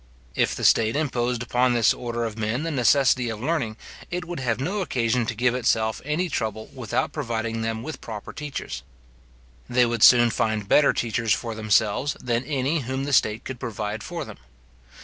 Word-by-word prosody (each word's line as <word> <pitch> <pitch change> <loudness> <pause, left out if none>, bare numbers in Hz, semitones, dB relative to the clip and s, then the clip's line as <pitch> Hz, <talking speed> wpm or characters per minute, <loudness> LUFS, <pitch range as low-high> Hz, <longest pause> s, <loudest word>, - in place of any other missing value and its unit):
If - - +1
the - - -6
state 110 +2 +4
imposed 125 -5 -1
upon 125 +1 +2
this 115 -3 +4
order 120 -1 -4
of 110 -2 -3
men 110 +5 -2
the 165 - -2
necessity 130 -1 +3
of 110 -2 -5
learning, 130 -5 -1 0.3
it 180 0 -3
would 175 -2 -5
have 120 -3 -1
no 195 +9 -1
occasion 120 -7 0
to - - -2
give 125 0 +2
itself 110 -3 0
any 150 +6 -1
trouble 110 -7 -3
about 125 +2 -2
providing 115 -6 -3
them 115 0 -2
with 155 - -7
proper 110 -3 -7
teachers. 150 -2 -5 0.9
They 125 0 +4
would 120 -1 -2
soon 120 -1 +7
find 110 -3 -1
better 145 +7 +5
teachers 115 -2 0
for 115 -2 -5
themselves, 110 +5 +1
than 120 0 -1
any 140 +3 0
whom 130 +1 -3
the 145 0 -3
state 110 -2 +2
could 130 -2 -6
provide 110 -3 -4
for 165 +3 -5
them. - - -11
120 Hz, 185 wpm, -24 LUFS, 110-135 Hz, 0.9 s, soon